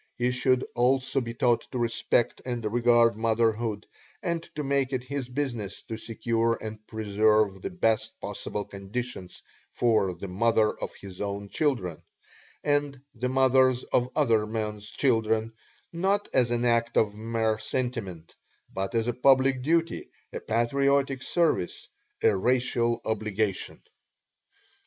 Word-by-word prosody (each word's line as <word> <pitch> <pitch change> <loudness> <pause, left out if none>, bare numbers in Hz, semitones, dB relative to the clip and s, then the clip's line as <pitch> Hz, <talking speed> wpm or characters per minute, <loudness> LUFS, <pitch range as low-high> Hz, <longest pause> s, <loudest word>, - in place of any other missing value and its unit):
He 125 +1 +1
should 125 0 +2
also 130 +2 +2
be 115 -1 -5
taught 120 -1 +1
to - - -3
respect 120 0 0
and 120 -3 -4
regard 120 -2 +4
motherhood, 110 -1 0 0.4
and 170 -3 -1
to 150 - -2
make 140 -1 0
it 130 -2 -2
his 130 -1 -4
business 125 -7 -3
to 110 - -6
secure 115 0 0
and 110 0 -6
preserve 105 -2 +2
the - - -3
best 115 - 0
possible 105 -1 -4
conditions 100 -1 -6 0.3
for 110 -6 +2
the 95 +3 -7
mother 110 +3 +2
of - - -5
his 95 -2 -10
own 100 0 -4
children, 120 - -1 0.6
and 145 -2 0
the 125 +2 -2
mothers 130 -1 +4
of 125 0 +3
other 115 -8 +3
men's 105 -1 -4
children, 110 -3 +1 0.4
not 195 +4 +1
as 125 -2 +3
an 120 0 0
act 115 -1 +2
of 105 -2 +3
mere 110 0 -1
sentiment, 110 -8 -4 0.4
but 95 +4 -3
as 115 -1 +2
a 120 - +1
public 130 +1 +4
duty, 165 +4 0 0.2
a - - -3
patriotic 135 +3 +1
service, 165 - 0 0.4
a - - +5
racial 120 +1 +1
obligation. 110 -2 -2
115 Hz, 135 wpm, -27 LUFS, 110-130 Hz, 0.6 s, a